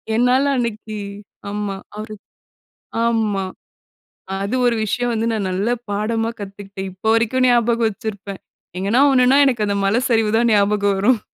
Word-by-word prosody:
என்னால 250 +3 +3
அன்னக்கி 215 -2 -3 0.5
ஆமா, 205 -1 -3 0.2
அவரு 215 0 -7 0.9
ஆமா. 215 -4 0 0.9
அ - - -3
அது 235 +6 -1
ஒரு 235 - +3
விஷயம் 245 +3 -1
வந்து 225 0 -1
நான் 200 -4 -1
நல்ல 195 +6 -1 0.2
பாடமா 225 +2 -1
கத்துக்கிட்டேன். 195 -1 -7
இப்போ 190 +4 -4
வரைக்கும் 245 +3 +2
ஞாபகம் 235 -1 +3
வச்சிருப்பேன். 200 -2 -7 0.4
எங்கன்னா 205 +8 +2
ஒன்னுனா 255 +1 +5
எனக்கு 235 -5 +1
அந்த 200 - 0
மல 205 +4 +2
சரிவு 225 -2 +2
தான் 235 0 +2
ஞாபகம் 200 -1 +2
வரும் 225 +2 +3
220 Hz, 145 wpm, -20 LUFS, 200-235 Hz, 0.9 s, ஒன்னுனா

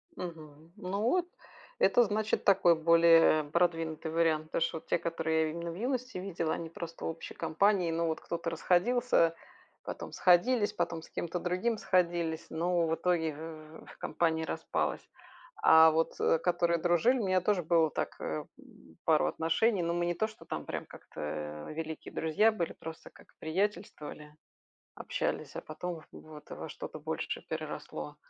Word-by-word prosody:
Мгм. 160 - -9
Ну, 200 0 -3
вот 345 +11 +2 0.5
это, 245 - +5
значит, 215 +1 0
такой 185 -4 +5
более 165 -1 +5
продвинутый 165 0 0
вариант. 160 -1 +2
Потому 160 - -2
что, 165 - 0
вот 160 - -12
те, - - +2
которые 160 -1 0
я - - -2
именно 170 +1 -5
в - - -8
юности 250 +2 -2
видела- 180 -4 -2
они 165 - -5
просто 165 0 -7
в - - -1
общей 165 0 -7
компании. 185 0 +2
Ну, 165 +1 0
вот 160 0 -1
кто-то 170 0 -3
расходился, 175 +1 +2 0.5
потом - - -6
сходились, 205 +5 +3
потом 170 -1 -2
с - - -14
кем-то 175 +1 -3
другим 185 +7 0
сходились, 175 -4 0
но, 170 0 +1
в 160 - +1
итоге, 165 -4 0
в 155 0 -9
в - - -15
в - - -14
компания 160 -1 0
распалась. - - -2 0.6
А, 160 0 +8
вот, 165 +1 0 0.3
которые 170 -1 +2
дружили, 175 +10 +3
у 215 - -1
меня 185 -1 +2
тоже 185 -2 +1
было 165 -1 +3
так, - - -3
э, 75 - -3 0.2
м, 80 -1 -18
пару 155 -2 +4
отношений. 180 +6 +1
Но 170 0 0
мы 175 0 0
не 175 - 0
то, 220 +5 0
что 215 - -14
там - - -5
прям - - -4
как-то 75 0 -7
великие 160 0 -6
друзья 165 +8 +3
были, 175 -6 -3
просто, 160 0 -9
как - - -18
приятельствовали, 160 -4 -3 0.6
общались, - - -3
а - - -4
потом 165 +2 -6
вот 155 -1 -13
во - - -6
что-то - - -7
большее - - -4
переросло. 75 -1 -5
170 Hz, 165 wpm, -31 LUFS, 160-185 Hz, 0.6 s, А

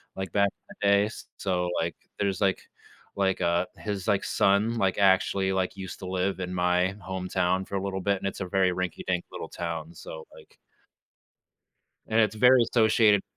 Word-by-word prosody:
like, 95 -3 -5
back 100 -1 +3 0.2
in - - -14
the 100 - +2
days. 100 +2 +2
So, 90 -2 -1
like, 85 -1 -2 0.2
there's, 100 -3 0
like 95 -1 +2 0.6
like, 95 -1 +1
uh, 85 +1 +1
his, 105 -1 -4
like, 100 - +1
son, 105 +4 +2
like, 95 -3 +1
actually, 95 0 +3
like, 95 +1 -1
used 95 -1 -7
to 95 - -7
live 95 +1 -1
in 90 0 -4
my 90 +1 +2
hometown 95 0 -1
for 100 - -6
a 95 - 0
little 95 -1 -3
bit, 100 +1 +1
and 95 - -3
it's 95 - -5
a - - -1
very 95 -1 +2
rinky 90 -2 -4
dink 90 -1 0
little - - -6
town, 85 -1 -5
so, 80 0 -9
like - - -18 1.5
And 110 +1 +3
it's 110 -1 +2
very 125 +2 +6
associated 110 -3 +4
95 Hz, 185 wpm, -27 LUFS, 90-100 Hz, 1.5 s, very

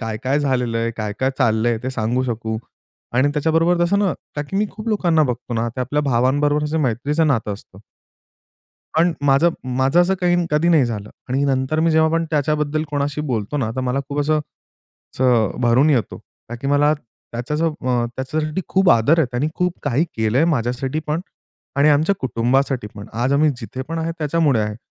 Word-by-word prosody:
काय-काय 115 +5 -1
झालेलं 125 -4 0
आहे, 115 0 0
काय-काय 110 +5 -1
चाललं 115 -2 +2
आहे 115 -2 0
ते 130 - -2
सांगू 125 +1 -1
शकू 110 -2 -3 0.6
आणि 130 +4 +3
त्याच्याबरोबर 165 +3 +2
तसं 200 +3 +2
ना 200 -3 +2 0.2
का 145 - -1
की 195 - -2
मी 210 +1 +2
खूप 220 +1 -7
लोकांना 175 -7 +2
बघतो 125 -2 -3
ना 115 +1 0
ते 130 - -2
आपल्या 145 +4 0
भावांबरोबर 145 +3 +2
असं 155 +2 -1
मैत्रीचं 140 +5 0
नातं 115 -7 0
असतं. 100 -1 -11 1.2
पण 170 +1 +4
माझं 140 +5 +4 0.3
माझं 135 +6 +4
असं 180 +2 +2
काही 175 0 +3 0.2
कधी 150 +3 +2
नाही 155 -7 +5
झालं 105 -3 -5 0.2
आणि 135 +2 +1
नंतर 135 +3 0
मी 165 0 +3
जेव्हा 160 0 +4
पण 165 0 +1
त्याच्याबद्दल 150 +1 0
कोणाशी 145 0 -2
बोलतो 110 +5 -2
ना 130 -6 -1
तर 130 - -1
मला 130 +2 0
खूप 145 - -2
असं 155 +1 +2 0.8
असं 120 -5 +3
अ, - - -9
भरून 120 +5 +4
येतो. 120 -9 0 0.3
का 120 - -5
की 135 +4 -5
मला 145 +1 +3
त्याचं 145 +3 -5
अ, 125 -6 -1
त्याच्यासाठी 155 +6 -2
खूप 190 -1 +3
आदर 130 +8 +4
आहे. 160 - +4
त्यांनी 125 +5 0
खूप 180 -1 0
काही 145 +4 +1
केलं 110 +2 +1
आहे 160 - +4
माझ्यासाठी 130 +2 -1
पण 155 +3 -1 0.5
आणि 140 +2 +4
आमच्या 155 +7 +3
कुटुंबासाठी 130 -1 0
पण. 100 +1 -9
आज 125 +4 0
आम्ही 150 +2 +4
जिथे 130 +2 -6
पण 165 0 -4
आहे 165 +1 -2
त्याच्यामुळे 150 -5 +2
आहे. 105 0 -3
140 Hz, 190 wpm, -20 LUFS, 120-155 Hz, 1.2 s, नाही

